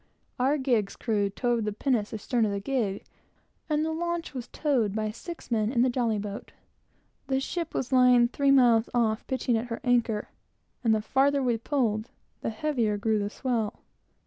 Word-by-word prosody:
Our 270 +4 +2
gig's 240 -7 0
crew 205 -4 0
towed 240 +2 0
the 210 - -1
pinnace 220 -1 0
astern 230 +2 -1
of 210 - -1
the 200 - -2
gig, 210 -3 -2 0.7
and 305 0 +1
the 320 - -1
launch 340 0 -3
was 250 -3 -6
towed 245 -10 0
by 215 -1 -1
six 335 +6 -9
men 220 -1 +1
in 240 -2 +3
the 255 - +2
jolly 235 -3 0
boat. 205 0 -6 0.7
The 265 0 +1
ship 335 +4 -4
was 255 - -2
lying 250 -2 +6
three 280 +3 0
miles 245 -4 +5
off, 220 -2 +1
pitching 255 -2 0
at 235 - -5
her 230 -1 -4
anchor, 235 -4 +1 0.5
and 225 -2 +4
the 215 - -2
farther 275 +4 +2
we 245 -2 +2
pulled, 225 -3 -1 0.3
the - - -2
heavier 225 -3 0
grew 215 +1 +1
the 205 0 -2
swell. 230 -3 -2
240 Hz, 180 wpm, -27 LUFS, 215-265 Hz, 0.7 s, lying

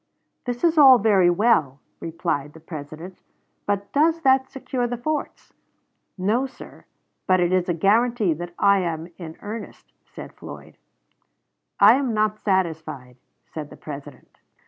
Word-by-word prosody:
"That 245 -1 -4
is 330 -2 +3
all 265 -3 +9
very 200 -5 +4
well," 170 - +2 0.2
replied 150 -3 -3
the 160 - -13
President, 160 +3 -9 0.5
"but 200 0 -2
does 320 +3 +2
that 265 -1 +3
secure 255 -2 -3
the 245 0 -4
forts?" 305 +5 -4 0.6
"No, 220 +8 0
sir; 260 - -14 0.4
but 185 0 +4
it 175 0 +1
is 185 -1 +1
a 175 - +1
guaranty 215 +1 +2
that 175 +2 -8
I 200 0 +4
am 165 -2 -3
in 160 -2 -8
earnest," 215 +1 -8
said - - -11
Floyd. - - -12 1.0
"I - - +7
am 260 -5 -1
not 215 0 0
satisfied," 160 - -2 0.3
said 150 -2 -8
the - - -13
President. 145 -2 -11
190 Hz, 145 wpm, -23 LUFS, 160-240 Hz, 1.0 s, all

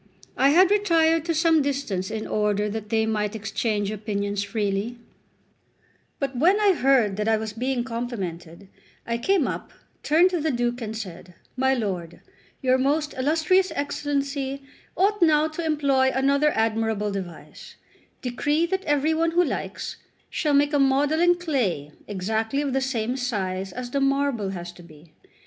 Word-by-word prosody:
I 270 - +4
had 365 +6 +5
retired 330 -6 +3
to 335 -1 0
some 325 -1 +4
distance 270 -10 -2
in 220 0 -4
order 210 -1 0
that 210 0 -5
they 220 0 +2
might 210 -1 -1
exchange 210 0 -2
opinions 205 -1 -2
freely; 205 +2 -2 1.2
but 275 -2 -3
when 355 +11 +4
I 410 -2 +4
heard 255 - +2
that 210 +1 -1
I 220 -1 +3
was 215 -1 -5
being 250 +2 -1
complimented, 200 -8 -6 0.4
I 235 0 -2
came 370 +1 +2
up, - - -5 0.3
turned 340 +5 +4
to 350 -3 -1
the 315 - 0
Duke, 240 -1 -1
and 220 -1 -4
said: 180 -4 -8 0.2
"My 265 +1 +2
lord, 185 -8 -4 0.4
your 260 0 +3
most 295 +3 0
illustrious 320 +7 +2
Excellency 280 -1 -2 0.3
ought 405 +1 +2
now 310 -2 +4
to 315 +2 -5
employ 280 -4 +2
another 280 +3 +2
admirable 220 -2 0
device: 185 -4 -8 0.5
decree 290 +6 0
that 380 +2 -2
every 295 +2 +2
one 330 +1 +1
who 345 +2 +3
likes - - -4 0.3
shall 300 -3 +1
make 290 +1 +3
a 290 - +3
model 280 +3 +2
in 350 +1 +5
clay 240 - -1 0.2
exactly 220 +7 -1
of 275 -3 -2
the 270 - +1
same 250 -2 -1
size 195 -6 -2
as 245 +3 -6
the 280 - 0
marble 275 -6 +1
has 175 -2 -6
to 175 - -15
be. 160 -1 -17
255 Hz, 160 wpm, -24 LUFS, 210-295 Hz, 1.2 s, had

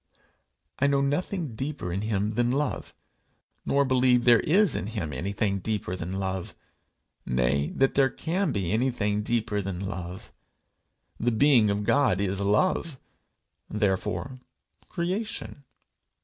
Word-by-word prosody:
I 140 - +3
know 140 -1 +2
nothing 150 - -1
deeper 130 - -4
in 95 - -2
him 105 -1 -1
than 120 +2 +1
love, 145 +4 -2 0.7
nor 140 0 +3
believe 125 -2 +3
there 120 -1 +6
is 190 +1 +3
in - - -3
him 100 -9 -4
anything 100 - -1
deeper 105 -3 -2
than 90 0 -5
love 95 -1 -3 0.7
nay, 65 +4 +1
that 135 0 +2
there 135 -1 +4
can 170 +5 -1
be 95 -7 -1
anything 110 -3 0
deeper 110 -2 -1
than 95 -2 -4
love. 95 -2 -6 0.9
The 120 - +1
being 120 -2 +4
of 100 +1 0
God 125 -5 +3
is 100 -1 -1
love, 130 - +1 0.7
therefore 105 +5 -1 0.5
creation. 180 -5 -4
110 Hz, 130 wpm, -27 LUFS, 95-140 Hz, 0.9 s, there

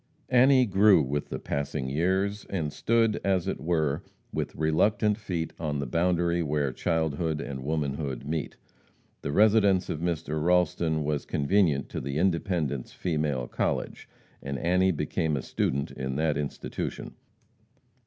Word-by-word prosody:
Annie 130 +1 +6
grew 100 -4 +5
with 70 +2 -3
the - - -3
passing 70 -1 -3
years, 95 +8 0
and 80 -7 -2
stood, 115 -1 +1
as 95 -3 +1
it - - -2
were, 80 -3 0 0.3
"with - - -3
reluctant 105 +7 +2
feet 85 -6 -3
on 75 -3 -2
the 70 - -2
boundary 85 +4 +1
where 75 -3 0
childhood 80 0 -1
and 65 -3 -5
womanhood 70 -3 -2
meet." 80 0 -3 0.7
The 70 - -3
residence 100 0 +4
of 75 - -3
Mr. 80 -2 -2
Ralston 85 -2 +2
was 75 -1 -2
convenient 75 -2 +2
to - - -4
the 70 +2 -3
Independence 85 - 0
Female 75 -7 -1
College, - - -2 0.3
and 70 0 -4
Annie 90 +5 +2
became 75 -1 -1
a 65 - -4
student 70 +1 -1
in 65 0 -4
that 75 0 +1
institution. 70 0 -4
80 Hz, 140 wpm, -27 LUFS, 70-90 Hz, 0.7 s, Annie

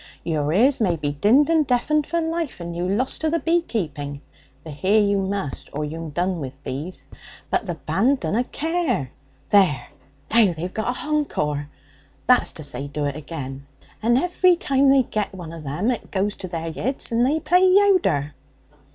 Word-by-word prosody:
Your 150 -3 -1
ears 245 - +3
may 180 -6 +2
be 150 -2 -2
dinned 220 - +4
and 315 -3 +3
deafened 290 +4 +1
for 340 - 0
life, 325 - -2
and 170 0 -6
you 175 +1 -2
lost 240 +7 -1
to 315 - +1
the 335 - +1
bee 335 +1 +2
keeping 145 - -4 0.4
(for 160 - -8
hear 190 +9 +2
you 200 -1 +2
must, 195 -7 -3
or 150 +1 -2
you'm 160 +2 -6
done, 175 +4 -1
with 135 -1 -8
bees), 150 +8 -5 0.5
but 215 - 0
the 175 - -2
band 195 - +1
dunna 200 +9 0
care! 305 - -1 0.4
There! 175 -12 +4 0.4
Now 220 -6 +5
they've 175 +3 -5
got 240 +3 -2
a - - -7
hencore 150 - -1 0.6
that's 250 - +4
to 155 - -6
say, 140 0 -3
do 145 +1 -3
it 140 -1 -2
agen; 140 -3 -7 0.3
and 240 +2 +3
every 360 +4 +3
time 275 -4 +2
they 270 -1 +5
get 210 -4 -3
one 170 -3 -8
of 160 -2 -9
them 165 - 0
it 240 - -5
goes 200 +1 -1
to 185 - -6
their 165 -2 -4
yeads, 260 - -3
and 230 +1 +2
they 290 +5 +2
play 360 +3 +3
louder.' 370 - +3
195 Hz, 185 wpm, -23 LUFS, -, 0.6 s, Now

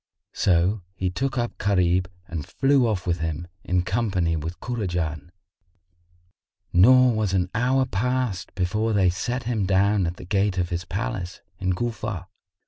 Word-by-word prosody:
So 95 +3 +2
he 95 -1 -1
took 135 +8 -2
up 120 -1 -2
Gharib 90 -2 +2 0.2
and 80 -3 -4
flew 135 - +2
off 100 -5 -1
with 85 -1 0
him, 80 +1 -3 0.2
in 90 0 +1
company 95 -5 0
with 80 +3 -5
Kurajan; 85 - -3 1.4
nor 125 +7 +6
was 110 -3 0
an 90 -1 +1
hour 130 +3 +2
past 125 -3 -1
before 105 +4 0
they 95 -3 +4
set 120 +7 -3
him 115 -5 -1
down 100 0 +3
at 85 +1 -4
the - - -9
gate 100 0 +1
of 90 -1 0
his 85 -1 -3
palace, 95 -2 -4 0.2
in 95 -1 0
Cufa. 105 -4 -3
95 Hz, 150 wpm, -24 LUFS, 90-115 Hz, 1.4 s, nor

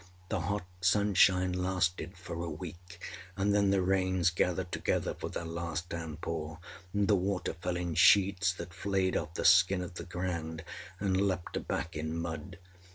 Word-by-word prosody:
â 90 0 -24
The 110 - 0
hot 100 +3 -2 0.2
sunshine 95 -1 +4
lasted 90 -1 -1
for 85 -2 -7
a 85 - -3
week, 85 +2 -8 0.4
and 100 +1 +2
then 100 -1 +4
the 95 -1 +3
rains 95 -1 +2
gathered 90 +1 0
together - - 0
for - - -6
their 85 - -4
last 85 +1 -4
downpour, 80 -1 -4 0.3
and 100 -1 +1
the 105 - +4
water 95 0 -1
fell 90 +1 -3
in 90 -1 -2
sheets 95 +3 +5
that 90 -1 -8
flayed 95 0 0
off 80 +1 -2
the - - -2
skin 95 0 +6
of 90 - -7
the 85 - -6
ground 85 -2 -4 0.4
and 95 -1 +1
leaped 90 -3 -3
back 80 +3 -2
in 80 +2 -3
mud. 85 +1 -5
90 Hz, 170 wpm, -31 LUFS, 85-95 Hz, 0.4 s, skin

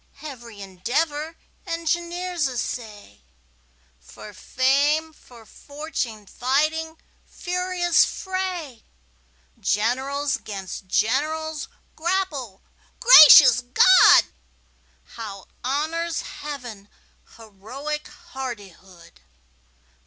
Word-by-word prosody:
Every 240 -7 -10
endeavor 290 - -3 0.3
engineers 340 0 -2
essay, 220 - -7 0.8
For 135 - -13
fame, 285 +8 0
for 240 -6 -18
fortune 285 -7 -7
fighting 305 +8 -1 0.3
furious 360 -1 0
fray! 365 - -5 0.8
Generals 270 +6 -1
'gainst 195 -4 -8
generals 305 +9 -1 0.3
grapple 315 - -3 0.4
gracious 295 - +9
God! 465 - +6 0.8
How 205 -5 -10 0.2
honors 315 +5 -2
Heaven 245 -9 -9 0.5
heroic 240 +8 -7
hardihood! 200 - -11
280 Hz, 65 wpm, -23 LUFS, 225-320 Hz, 0.8 s, gracious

